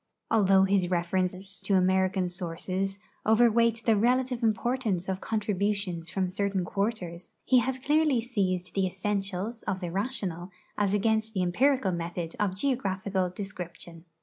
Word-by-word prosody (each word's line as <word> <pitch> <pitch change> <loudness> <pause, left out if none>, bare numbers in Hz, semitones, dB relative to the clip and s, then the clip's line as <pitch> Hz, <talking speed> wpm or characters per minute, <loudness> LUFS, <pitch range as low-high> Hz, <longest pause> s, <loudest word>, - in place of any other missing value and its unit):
Although 195 -3 +5
his 190 -2 +2
references 185 +2 -1
to 200 - +1
American 185 0 +2
sources 185 +3 -3 0.2
overweight 230 0 +4
the 225 - +4
relative 250 +3 +1
importance 225 -4 0
of 190 0 -2
contributions 200 -5 -1
from 190 -1 -1
certain 195 0 -1
quarters, 190 -4 -3
he 255 - +5
has 255 +2 -1
clearly 295 0 +2
seized 190 -7 -1
the 195 -1 +1
essentials 195 +3 -2
of 190 0 -1
the 175 -2 -4
rational 195 -4 -2 0.3
as 205 -1 +1
against 220 +1 +1
the 185 - +1
empirical 250 +4 +2
method 170 -1 -4
of 195 -3 0
geographical 195 -6 -1
description. 175 -3 -8
195 Hz, 135 wpm, -28 LUFS, 185-225 Hz, 0.3 s, Although